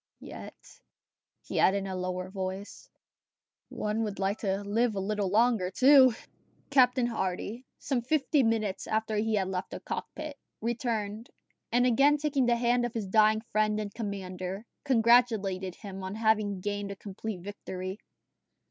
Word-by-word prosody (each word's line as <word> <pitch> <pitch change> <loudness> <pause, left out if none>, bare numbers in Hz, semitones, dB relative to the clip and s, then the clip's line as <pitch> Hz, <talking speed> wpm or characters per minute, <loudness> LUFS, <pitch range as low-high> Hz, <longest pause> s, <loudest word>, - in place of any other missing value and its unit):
"Yet," - - -9 0.9
he - - -3
added 195 - +4
in 195 - -3
a 190 -1 -4
lower 185 0 -3
voice, 190 +1 -6 0.8
"one 210 +1 -2
would 210 -3 -3
like 195 +2 -1
to 195 -1 -1
live 220 +2 +1
a - - -1
little 200 0 -1
longer, 220 -2 +3
too!" 260 +3 +6 0.6
Captain 250 -2 +4
Hardy, 225 +2 -3
some 260 -4 -1
fifty 285 +3 +2
minutes 225 -5 0
after 220 0 -1
he 220 +1 +1
had 190 -2 0
left 185 0 -3
the - - -6
cockpit, 305 -2 -6 0.2
returned, 225 -1 -2 0.4
and 245 +1 +3
again 275 +5 +4
taking 280 -4 +1
the 240 - +4
hand 240 +1 +2
of 240 0 -3
his 220 -3 -2
dying 215 +2 +4
friend 215 -1 0
and 205 -1 -5
commander, 195 -2 -5 0.2
congratulated 225 -7 +3
him 195 -2 -8
on 190 +2 -5
having 215 -3 +1
gained 205 0 -3
a 200 - -5
complete 200 0 -6
victory. 190 -1 -6
215 Hz, 150 wpm, -29 LUFS, 195-240 Hz, 0.9 s, too